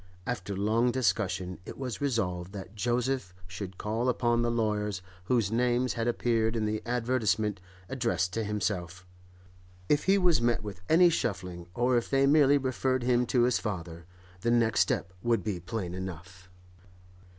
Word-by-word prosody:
After 100 -5 -3
long 110 +5 +2
discussion, 95 -7 -1
it - - -9
was 130 -2 -5
resolved 95 -9 -1
that 95 -1 -8
Joseph 120 -3 -1
should 90 +1 -7
call 115 +4 -1
upon 120 -1 +1
the 120 - +1
lawyers 105 -4 -1 0.2
whose 115 -2 +1
names 125 +2 +1
had 115 0 -2
appeared 115 -1 +1
in 110 -1 0
the 105 0 -1
advertisement 110 -5 0 0.3
addressed 95 -8 -1
to 115 - -1
himself. 95 -4 -3 0.8
If 150 0 +2
he 195 +1 +5
was 175 -8 +3
met 120 -2 +1
with 100 -3 -7
any 175 +2 +6
shuffling, 90 - -3
or 125 +1 +2
if 120 - -2
they 135 0 +3
merely 145 0 +5
referred 130 -1 0
him 125 0 +2
to 120 0 +3
his 125 0 +2
father, 85 -5 -5 0.3
the 115 - -1
next 115 -1 +3
step 90 - +1
would 115 +1 +1
be 105 -5 -2
plain 90 -1 -4
enough. 95 0 -8
115 Hz, 160 wpm, -29 LUFS, 95-125 Hz, 0.8 s, any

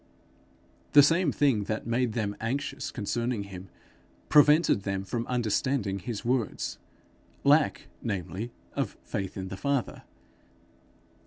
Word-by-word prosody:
The 145 - +9
same 165 +1 +3
thing 130 -9 +2
that 110 +1 -3
made 120 0 0
them 105 -3 -2
anxious 125 +5 -2
concerning 115 0 -2
him, 95 -2 -9 0.6
prevented 150 -5 +5
them 100 -1 -2
from 115 +4 -3
understanding 120 -3 0
his 110 +4 -5
words 120 -4 -1 0.6
lack, 145 +2 +3
namely, 100 +2 -4 0.2
of - - -2
faith 95 -2 -4
in 95 -1 -4
the 95 - -6
Father. 140 +2 -1
115 Hz, 115 wpm, -28 LUFS, 100-135 Hz, 0.6 s, The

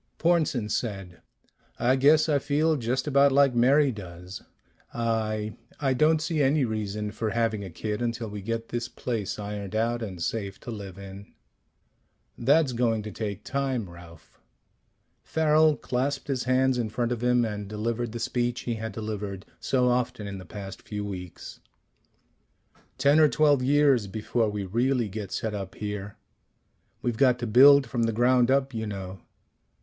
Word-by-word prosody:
Pornsen 155 -9 +1
said, 100 -6 -4 0.6
"I 125 +2 +3
guess 150 +4 +5
I 145 -2 +2
feel 150 +3 +1
just 125 -1 -1
about 140 -1 +4
like 140 -1 +4
Mary 135 +4 +4
does. 90 -3 -9 0.5
I 110 -2 -1 0.3
I 135 -2 +1
don't 155 +4 +3
see 155 -2 0
any 140 0 +3
reason 105 -1 -3
for 110 +1 -3
having 110 -2 0
a 95 - -7
kid 105 +6 -4
until 115 -1 -2
we 105 -1 -7
get 115 +2 -4
this 120 0 -3
place 115 -6 -4
ironed 105 -1 -5
out 115 +2 0
and 95 -6 -6
safe 100 +2 -3
to 120 - -7
live 100 -4 -8
in." 100 0 -10 1.0
"That's 140 +2 +3
going 115 -2 0
to 105 - -6
take 105 -2 -5
time, 135 -6 -2
Ralph." 85 -2 -15 0.8
Farrel 155 -1 +3
clasped 135 +3 -2
his 130 -3 -1
hands 130 0 +2
in 115 -2 -1
front 120 +2 -2
of 120 -2 -2
him 125 -1 +3
and 105 -2 -5
delivered 115 +3 -3
the 120 - -6
speech 120 +1 -1
he 120 - -2
had 110 -1 -4
delivered 105 -3 -5
so 125 -2 +1
often 125 -2 0
in 100 -1 -6
the 95 - -10
past 100 +1 -8
few 105 -1 -5
weeks. 90 -3 -8 1.4
"Ten 145 +2 +4
or 155 -1 +6
twelve 145 +2 +3
years 135 -4 +3
before 110 +2 -1
we 105 -1 -4
really 120 +3 0
get 100 -1 -6
set 110 -1 -3
up 95 -2 -6
here. 105 -1 -5 0.9
We've 120 -2 -1
got 125 -1 +4
to 120 - -4
build 135 +5 +7
from 120 0 -3
the 115 - +1
ground 125 +2 +3
up, 135 0 +2
you 110 -1 -3
know. 95 -2 -6
115 Hz, 165 wpm, -26 LUFS, 105-130 Hz, 1.4 s, build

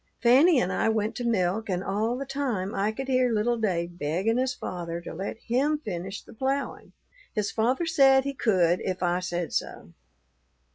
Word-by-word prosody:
Fanny 270 +6 +5
and 185 -4 0
I - - +1
went 220 -1 0
to 245 - -3
milk, 215 -1 0
and 180 0 -1
all 220 +5 -1
the 275 - -4
time 255 -9 -2
I 200 +2 0
could 265 +4 -6
hear 255 -1 +2
little 225 +2 +1
Dave 175 -4 -2
begging 190 +11 0
his 260 0 +1
father 170 -1 -5
to 170 - -8
let 190 +6 -5
him 270 +7 0
finish 195 - -6
the - - -14
ploughing. 270 +4 -3 0.4
His 210 -2 -1
father 250 +9 +1
said 270 -4 +5
he 280 +1 -3
could 180 -8 +2
if 185 -1 -3
I 175 0 +1
said 175 -2 -3
so. - - -4
220 Hz, 185 wpm, -27 LUFS, 180-255 Hz, 0.4 s, Fanny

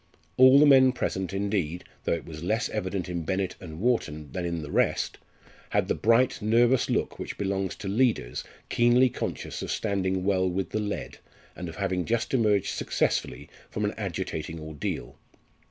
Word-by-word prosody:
All 130 +1 +8
the 150 - +7
men 130 -3 +7
present 95 -7 -2
indeed 95 -4 -1 0.2
though - - +2
it 85 - -3
was 75 -2 -8
less 110 +6 0
evident 95 -3 -3
in 90 -1 -3
Bennett 95 +3 -2
and 80 -3 -8
Wharton 80 - -1
than 90 +4 -3
in 85 -2 -3
the 75 - -7
rest - - +1 0.5
had - - +1
the - - +2
bright 115 +3 +3
nervous 120 +4 +3
look - - -1
which - - -5
belongs 95 -1 -1
to 100 - -7
leaders 100 - +1 0.2
keenly 120 +2 +4
conscious - - -4
of - - -5
standing 95 -3 -1
well 95 -1 +2
with 90 -1 -2
the 110 - -1
led, 105 -1 -4 0.4
and 90 -1 -6
of 80 - -9
having 95 -2 -1
just 115 +2 -1
emerged 105 -6 +2
successfully 65 +4 -1 0.2
from - - -2
an - - -1
agitating 80 +1 -4
ordeal. 75 -5 -5
95 Hz, 170 wpm, -27 LUFS, 85-115 Hz, 0.5 s, All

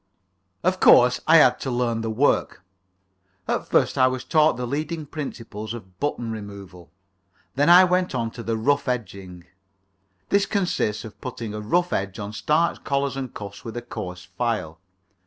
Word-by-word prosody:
Of 185 +1 +1
course, 125 +1 +6
I 165 +1 +7
had 125 -5 +5
to 135 - -4
learn 120 -2 -1
the 115 - -3
work. 110 -4 +1 0.8
At - - -1
first - - +2
I 130 - +6
was 130 0 -3
taught 155 -1 +3
the 125 - -3
leading 155 +5 -3
principles 115 -7 -6
of 95 -5 -13
button 120 -5 -2
removal. 100 -5 -9 0.6
Then 145 +4 +2
I 180 +2 +9
went 180 -4 +1
on 115 -2 -2
to 120 - -8
the 115 -1 -2
rough 140 +6 +1
edging. 95 -7 -5 0.9
This 200 0 +2
consists 180 - -1
in 110 - -8
putting 115 -3 -7
a 105 - -5
rough 175 +12 0
edge 95 0 -2
on 105 0 -6
starched 155 +9 0
collars 140 -1 -1
and 135 -2 -5
cuffs 100 -1 -9
with 115 +1 -7
a 120 - -5
coarse 90 -6 -7
file. 95 -5 -3
120 Hz, 170 wpm, -24 LUFS, 105-145 Hz, 0.9 s, I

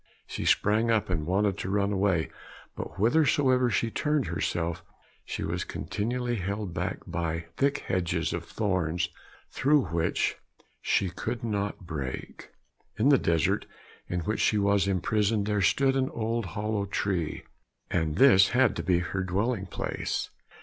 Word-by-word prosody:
She - - -5
sprang 110 +3 +3
up 110 -4 +1
and 80 -3 -1
wanted 100 +2 +1
to 95 - -3
run 100 +1 +1
away, 95 -4 +1 0.4
but - - -6
whithersoever 130 +2 +3
she 115 +1 0
turned 150 +1 0
herself, 85 -1 -2 0.4
she - - -4
was - - -2
continually 120 +2 -2
held 100 -1 -3
back - - -3
by 85 -1 -3
thick 140 +1 +1
hedges 85 -2 0
of 85 -1 -3
thorns 90 -4 -1 0.4
through 140 - +2
which 85 0 0 0.4
she 95 -3 +1
could 120 +7 -4
not 100 -3 -2
break. 70 -6 -6 0.5
In 115 +7 +3
the 140 -3 +6
desert, 80 -3 +1 0.4
in 90 0 -2
which 105 +6 -2
she 105 - +3
was 100 -1 +2
imprisoned, 100 +2 +1
there 105 -1 0
stood 135 +7 +3
an 135 0 +1
old 115 - -2
hollow 105 -1 -1
tree, 95 -5 -2 0.5
and 80 -3 0
this 100 -4 +7
had 130 -6 +4
to - - -1
be 90 -2 +3
her 90 +2 -2
dwelling 95 +3 -1
place. - - -3
100 Hz, 150 wpm, -28 LUFS, 90-115 Hz, 0.5 s, this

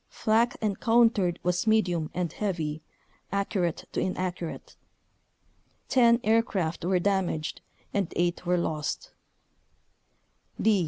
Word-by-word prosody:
Flak 230 +2 +1
en 205 -3 0
countered 225 -6 +3
was 180 +3 0
medium 180 -8 +2
and 180 -2 -2
heavy, 160 -7 -2 0.5
accurate 195 -4 -1
to - - -2
inaccurate; 180 -2 -4 1.1
10 235 -2 +5
aircraft 205 -7 +1
were 185 +1 +2
damaged 180 -4 -1 0.3
and 200 -4 0
eight 175 0 0
were 180 0 +1
lost. 160 - -3
185 Hz, 100 wpm, -27 LUFS, 170-215 Hz, 1.1 s, 10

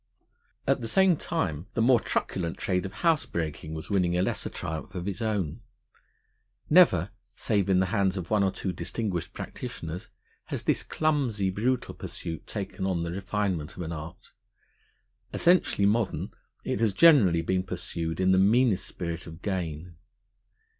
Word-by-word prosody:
At 135 -1 +2
the 115 - -3
same 190 +7 +4
time 80 - -2
the 115 - +2
more 125 0 +6
truculent 85 -6 -2
trade 90 0 -1
of - - -10
housebreaking 80 - 0
was 80 +4 -7
winning 90 -3 +2
a 90 - +2
lesser - - -1
triumph 80 +4 -6
of 90 +1 -4
its 100 +2 -3
own. 105 -9 -1 1.1
Never, 105 - +6 0.2
save 100 -4 0
in 95 -1 +4
the 95 - +3
hands 95 -1 +2
of 90 0 -6
one 105 -1 +4
or 95 - +3
two 95 -1 -3
distinguished 100 -6 -3
practitioners, 85 +3 -6 0.4
has - - -4
this - - +1
clumsy, 130 -11 0
brutal 120 +6 -1
pursuit 80 -2 -7
taken 95 -2 -4
on 90 -3 0
the 85 0 -3
refinement 95 -4 -2
of 90 - -4
an 80 - -5
art. 80 0 -8 1.0
Essentially 175 - +3
modern, 110 +1 +1 0.3
it - - -2
has 110 -3 +2
generally 100 - +6
been 95 +2 +1
pursued 85 -2 -4
in 95 0 +3
the 95 - +5
meanest 110 0 +3
spirit 85 0 -5
of 80 +2 -11
gain. 85 -4 -3
95 Hz, 155 wpm, -28 LUFS, 85-110 Hz, 1.1 s, more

